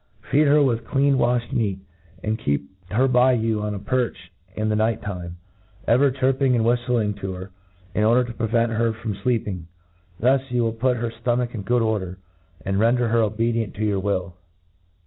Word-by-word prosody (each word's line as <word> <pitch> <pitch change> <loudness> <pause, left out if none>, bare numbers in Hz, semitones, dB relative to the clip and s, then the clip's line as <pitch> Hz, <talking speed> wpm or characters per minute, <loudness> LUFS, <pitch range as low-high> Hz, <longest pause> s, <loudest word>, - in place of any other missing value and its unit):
Feed 150 +1 +4
her 145 +1 +5
with 115 -4 0
clean 140 0 +2
waihed 120 0 +1
meat; 100 -5 0 0.5
and 110 +1 -1
keep 70 -6 -2 0.2
her 120 +8 +2
by 125 0 +4
you 110 -2 0
on 105 0 -2
a - - -5
perch 120 -7 -2 0.2
in 110 0 -1
the 110 - +1
night 110 +1 +1
time, 90 -4 -6 0.5
ever 135 +4 +4
chirping 130 0 +1
and 115 -2 +1
whiftling 120 -3 +1
to 95 -1 -4
her, 95 +1 -8 0.4
in 105 - +1
order 120 +3 +4
to 120 -1 -7
prevent 115 +1 +1
her 115 0 +1
from 110 -1 -4
fleeping. 100 -7 -2 0.5
Thus 130 +3 +3
you 125 -1 +1
will 115 -1 0
put 125 +2 +1
her 115 0 -2
ftomach 120 +1 -1
in 110 - -4
good 120 +4 +1
order^ 100 -5 -1 0.5
and 95 0 0
ren 115 +3 +4
der 120 -2 0
her 115 +1 +3
obedient 115 0 -1
to 110 - -2
your 100 -2 +1
will. 90 -3 -2
115 Hz, 190 wpm, -23 LUFS, 105-125 Hz, 0.5 s, her